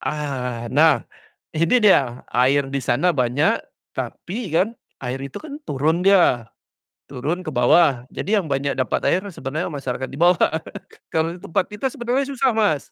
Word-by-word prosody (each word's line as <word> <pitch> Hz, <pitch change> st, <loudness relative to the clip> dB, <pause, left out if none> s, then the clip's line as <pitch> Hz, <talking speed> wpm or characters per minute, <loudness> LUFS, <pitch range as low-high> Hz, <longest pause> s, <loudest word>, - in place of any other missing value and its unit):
Ah, 130 Hz, -6 st, -3 dB
nah, 145 Hz, -3 st, +4 dB, 0.5 s
ini 165 Hz, +10 st, +2 dB
dia, 130 Hz, -11 st, +3 dB
air 135 Hz, +3 st, +3 dB
di 140 Hz, -, -1 dB
sana 130 Hz, +9 st, +2 dB
banyak. 130 Hz, +3 st, +1 dB, 0.3 s
Tapi 205 Hz, +3 st, -5 dB
kan, 190 Hz, +6 st, +3 dB, 0.3 s
air 130 Hz, +1 st, -3 dB
itu 135 Hz, -1 st, -7 dB
kan 300 Hz, -1 st, -8 dB
turun 155 Hz, +5 st, +1 dB
dia, 130 Hz, -, +4 dB, 0.6 s
turun 170 Hz, +8 st, -4 dB
ke -, -, -2 dB
bawah, 125 Hz, +1 st, +4 dB
jadi 210 Hz, +1 st, 0 dB
yang -, -, -9 dB
banyak 140 Hz, +1 st, 0 dB
dapat 130 Hz, -1 st, -1 dB
air 185 Hz, -, +2 dB
sebenarnya 155 Hz, +2 st, -4 dB
masyarakat 130 Hz, -2 st, -4 dB
di 135 Hz, -, -9 dB
bawah 175 Hz, 0 st, +4 dB, 0.6 s
kalau 165 Hz, +2 st, 0 dB
di -, -, -13 dB
tempat 185 Hz, +2 st, 0 dB
kita 210 Hz, +5 st, -6 dB
sebenarnya 260 Hz, +1 st, -1 dB
susah, 265 Hz, -1 st, +2 dB
Mas. 205 Hz, -10 st, +1 dB
155 Hz, 160 wpm, -22 LUFS, 130-185 Hz, 0.6 s, nah